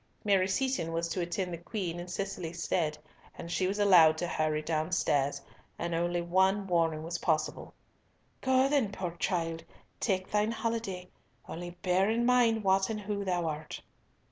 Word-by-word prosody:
Mary 195 -3 +3
Seaton 200 -5 0
was 165 +1 -1
to 180 - -2
attend 175 +1 -2
the 170 - -5
Queen 175 -2 -4
in 175 - -7
Cicely's 175 -2 -4
stead, 155 -4 0 0.4
and 170 - -7
she 185 +2 +1
was 195 +2 -2
allowed 175 -6 +6
to 175 - -2
hurry 155 -2 0
downstairs, 155 -3 0 0.4
and 170 0 -3
only 175 +1 0
one 190 +3 +2
warning 165 -4 +1
was 170 +1 -4
possible: 155 -2 -1 0.7
"Go 260 0 +3
then, 275 -8 +1
poor 185 -3 -4
child, 165 -3 -1 0.4
take 190 -3 -1
thine 210 +1 +2
holiday, 225 -6 -3 0.4
only 175 +1 -7
bear 185 +2 +3
in 235 +2 +1
mind 240 -3 +3
what 190 +1 +3
and 215 -1 -3
who 205 0 -3
thou 180 -3 0
art." 155 -1 -4
180 Hz, 165 wpm, -30 LUFS, 165-200 Hz, 0.7 s, allowed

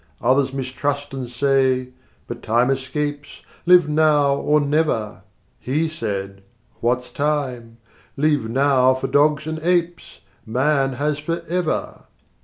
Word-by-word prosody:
80 105 - -14
Others 130 +1 +2
mistrust 140 +2 -3
and 130 -3 -5
say, 130 0 +1 0.4
"But - - -7
time 120 +4 +2
escapes: 145 +2 -4 0.3
Live 180 -3 +6
now 150 -2 +3
or 150 +2 +2
never!" 140 - -1 0.4
He 150 +6 -1
said, 100 -10 -5 0.4
"What's 125 +1 -1
time? 130 -6 -2 0.4
Leave 145 -5 +1
Now 130 0 +3
for 130 - -4
dogs 150 +1 +2
and 160 0 -4
apes! 175 0 -1 0.2
Man 135 +3 +1
has 145 +3 -1
Forever." 170 +2 -3
140 Hz, 120 wpm, -21 LUFS, 125-150 Hz, 0.4 s, Live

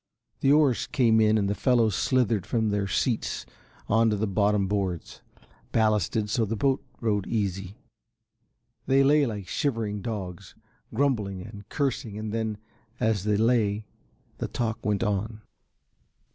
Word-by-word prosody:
The 135 - +3
oars 145 -5 +3
came 115 -6 +3
in 110 0 +4
and 100 -2 +1
the 100 - +1
fellows 115 -2 +2
slithered 115 -5 +1
from 110 -2 +1
their 100 -1 0
seats 115 +3 -1 0.4
on 115 +2 +3
to 105 - +1
the 105 +2 0
bottom 100 0 +2
boards. 95 -4 -3 0.5
Ballasted 110 -1 +1
so 115 +3 +1
the 110 +1 -1
boat 135 +4 +1 0.2
rode 105 -4 0
easy. 100 -3 -2 1.1
They 135 +1 +5
lay 145 0 +4
like 105 -5 -5
shivering 110 -8 -1
dogs, 95 -4 -6 0.4
grumbling 110 -7 0
and 105 0 -11
cursing 135 -7 -2
and 110 0 -4
then, 110 -2 -2 0.4
as 110 -3 +1
they 105 -1 +2
lay, 110 -2 +2 0.5
the - - -2
talk 115 -2 -3
went 105 0 0
on. 105 +1 -2
110 Hz, 145 wpm, -27 LUFS, 100-115 Hz, 1.1 s, They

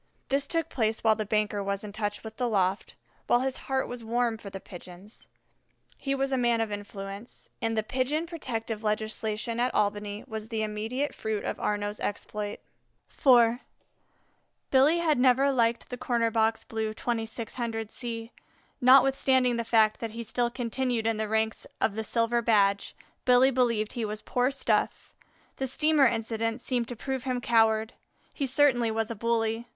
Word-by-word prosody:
This 275 +1 +1
took 330 -1 0
place 220 -6 -1
while 220 -1 +5
the 215 -1 -4
banker 210 -1 0
was 200 0 -2
in 210 - -7
touch 205 0 -3
with 220 0 -9
the 245 -2 0
loft, 195 -2 0 0.3
while 240 - +4
his 265 0 -1
heart 265 0 +1
was 245 -1 -6
warm 230 0 0
for 205 - -8
the 195 - -7
Pigeons. 185 +3 -11 0.7
He 275 0 -2
was 270 0 -1
a 265 - +1
man 240 -1 +2
of 225 -2 -1
influence, 200 +1 -8
and 225 -1 -1
the 220 - +2
Pigeon 265 +8 -1
Protective 230 -9 -4
legislation 215 +1 -2
at 250 +1 +2
Albany 205 0 -1
was 220 0 -6
the 220 -2 -1
immediate 220 +7 -2
fruit 220 -2 -3
of - - -3
Arnaux's 205 0 -2
exploit. 205 0 -4 0.5
IV 240 -3 +5 1.1
Billy 280 +5 +5
had 320 -6 +2
never 260 +2 +4
liked 235 -3 +1
the 250 - -5
Corner 235 -2 +1
box 220 0 +1
Blue 220 -1 -3
(2600 225 -1 -3
C); 230 -1 -5 0.5
notwithstanding 260 -1 +5
the 235 - -1
fact 220 -2 +3
that 225 -2 -5
he 235 +1 -5
still 235 +2 0
continued 240 -1 -2
in 225 -1 +1
the 215 0 -1
ranks 220 0 0
of 210 - +1
the 220 +1 -3
Silver 230 +1 +1
Badge, 200 -3 +2 0.3
Billy 250 +1 +5
believed 235 -4 +1
he 235 - -3
was 215 0 -4
poor 250 +1 +1
stuff. 275 -1 -1 0.4
The 265 - -2
steamer 300 +1 +4
incident 225 0 -1
seemed 245 -2 -1
to 245 - -6
prove 265 +2 -4
him 255 -1 -1
coward; 225 -1 +2 0.4
he 280 - -2
certainly 260 -3 +3
was 225 0 -1
a - - -4
bully. 230 +1 0
230 Hz, 170 wpm, -28 LUFS, 215-250 Hz, 1.1 s, while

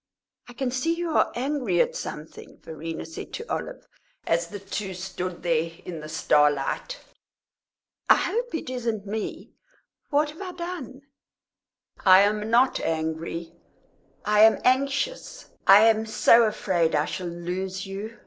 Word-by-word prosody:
"I - - -10
can 250 +1 -2
see 295 +7 0
you 340 -1 -3
are - - +2
angry 250 -8 -1
at - - +2
something," 150 +1 -8
Verena 160 +1 -6
said 160 - -9
to 460 - -5
Olive, - - -5 0.4
as 170 +1 +1
the 205 +4 -8
two 195 -1 -5
stood 185 -1 -5
there 165 -1 +1 0.2
in 170 -3 -6
the 155 0 -9
starlight. 150 - +1 1.1
"I - - +9
hope 480 -3 -2
it 320 - -4
isn't 230 -5 -3
me. 210 +1 -5 0.6
What 295 0 +1
have 310 - -13
I 370 -2 -6
done?" 340 -7 -7 1.0
"I 185 0 +8
am 210 +1 +1
not 245 +3 +3
angry 165 +1 -3 0.7
I 210 0 +2
am 220 +1 +7
anxious. 275 - 0 0.2
I 195 +2 +9
am 220 0 +4
so 230 +1 +5
afraid 180 -7 0
I 150 0 +2
shall 180 - -5
lose 180 +2 -4
you. 205 +4 -7
210 Hz, 145 wpm, -25 LUFS, 170-260 Hz, 1.1 s, I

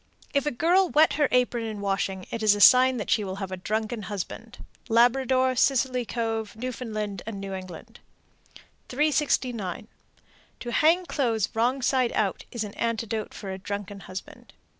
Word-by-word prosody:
If 280 0 +1
a - - +1
girl 350 +8 +3
wet 310 +2 +4
her 295 -2 +2
apron 250 -2 +1
in 215 -2 -5
washing, 195 -2 -2
it 230 - -4
is 215 -1 +5
a - - -4
sign 255 +3 +7
that 215 - -4
she 215 - +3
will 190 -1 -4
have 195 -1 -6
a - - -2
drunken 215 +4 -3
husband. 210 +4 -6 0.3
Labrador, 255 +2 +3
Scilly 255 -1 +2
Cove, 225 -2 -3
N.F., 255 +1 -5
and 215 -5 -4 0.2
New 195 0 -6
England. 190 +5 -9 0.9
369. 250 - 0 0.7
To 240 - -5
hang 330 +8 +3
clothes 230 - 0
wrong 245 +4 0
side 255 -2 +2
out 200 -3 -1
is 235 -2 -3
an 205 -1 -7
antidote 225 -1 -2
for 195 - -6
a 190 - -6
drunken 200 +1 -6
husband. 185 -1 -10
230 Hz, 160 wpm, -26 LUFS, 205-255 Hz, 0.9 s, sign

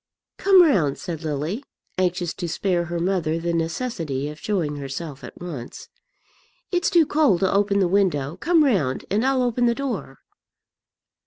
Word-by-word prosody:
"Come 385 -2 +7
round," 175 - +2
said 165 -3 -6
Lily, 155 - -3 0.4
anxious 180 -2 0
to 175 -3 -5
spare 175 0 0
her 170 0 -4
mother 170 -3 0
the 170 +1 -2
necessity 165 - -2
of 150 +1 -9
showing 165 -9 -1
herself 140 +1 -6
at - - -10
once. 155 -9 -8 0.8
"It's 355 -1 +1
too 335 -2 +5
cold 290 - +2
to 190 - +2
open 200 0 +2
the 190 - +3
window; 175 -6 +1
come 330 - +3
round, 185 - +1
and 210 +4 +2
I'll 265 -1 +2
open 245 0 +1
the 235 - +2
door." 235 - -4
180 Hz, 160 wpm, -23 LUFS, 155-235 Hz, 0.8 s, Come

